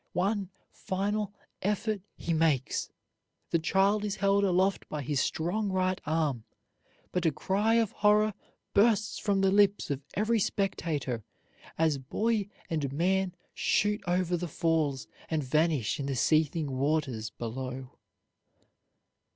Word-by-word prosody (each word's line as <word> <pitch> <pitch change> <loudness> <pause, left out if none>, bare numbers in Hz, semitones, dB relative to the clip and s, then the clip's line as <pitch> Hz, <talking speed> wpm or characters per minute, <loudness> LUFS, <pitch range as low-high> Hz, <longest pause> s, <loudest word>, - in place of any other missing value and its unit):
One 195 +1 0 0.2
final 205 +2 -2 0.3
effort 210 +1 -1
he 170 - -2
makes; 155 -5 +1 0.6
the 170 - +3
child 195 +5 +2
is 205 -2 -1
held 200 +1 +2
aloft 190 +1 +1
by 150 -2 -3
his 140 +1 0
strong 190 +9 -1
right 185 0 0
arm; 150 -7 0 0.7
but 180 -2 +1
a - - +3
cry 205 +9 +1
of 230 -3 +2
horror 210 +1 +3 0.4
bursts 215 0 +3
from 200 -2 +1
the 195 0 +4
lips 200 -4 +3
of 140 -1 -2
every 220 +3 +2
spectator 155 - -1 0.5
as 155 -3 +2
boy 210 - 0 0.2
and 150 -5 -2
man 185 +4 +1 0.2
shoot 210 +1 +1
over 180 0 +1
the 175 0 -3
falls 155 -4 0 0.2
and 155 -2 0
vanish 150 -4 +1
in 140 - -2
the 135 - -1
seething 155 +2 +2
waters 135 -5 0
below. 130 +3 -6
175 Hz, 130 wpm, -29 LUFS, 145-200 Hz, 0.7 s, the